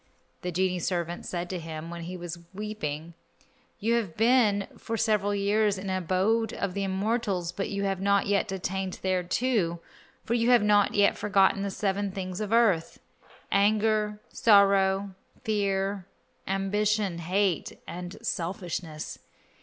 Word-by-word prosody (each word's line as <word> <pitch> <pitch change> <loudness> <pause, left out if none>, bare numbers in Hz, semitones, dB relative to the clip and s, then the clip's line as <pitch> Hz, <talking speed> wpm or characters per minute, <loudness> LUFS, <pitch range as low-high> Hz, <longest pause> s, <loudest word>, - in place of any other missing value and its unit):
The 180 - -3
genie 185 +1 0
servant 175 0 -2
said 175 -1 -3
to 185 - -3
him 165 0 -7
when 170 0 -6
he 175 +2 -6
saw 170 0 -6
him 170 - -21
weeping, 170 -7 -4 0.6
"You 225 +3 0
have 205 -9 -3
been 220 -3 +3
for 225 - -4
several 210 -2 +1
years 205 0 +2
in 190 - -7
the 190 -1 -1
abode 195 +6 +1
of 185 - -2
the 200 - -2
immortals, 195 -2 -1
but 195 - -3
you 200 0 -2
have 195 -1 -1
not 200 0 +3
yet 200 -1 +1
attained 190 0 -3
thereto, 185 0 0 0.4
for 230 - -2
you 235 0 +2
have 240 -3 +6
not 205 -1 +3
yet 205 -1 +3
forgotten 195 -1 +3
the 200 - -1
seven 200 +1 -1
things 185 0 -5
of 210 -1 -3
earth: 215 -8 +2 0.5
anger, 210 +1 +2
sorrow, 195 -2 +4 0.3
fear, 200 -3 -1 0.4
ambition, 195 -1 0
hate 185 +1 0
and 175 +1 -7
selfishness. 170 -4 -4
195 Hz, 145 wpm, -28 LUFS, 180-210 Hz, 0.6 s, have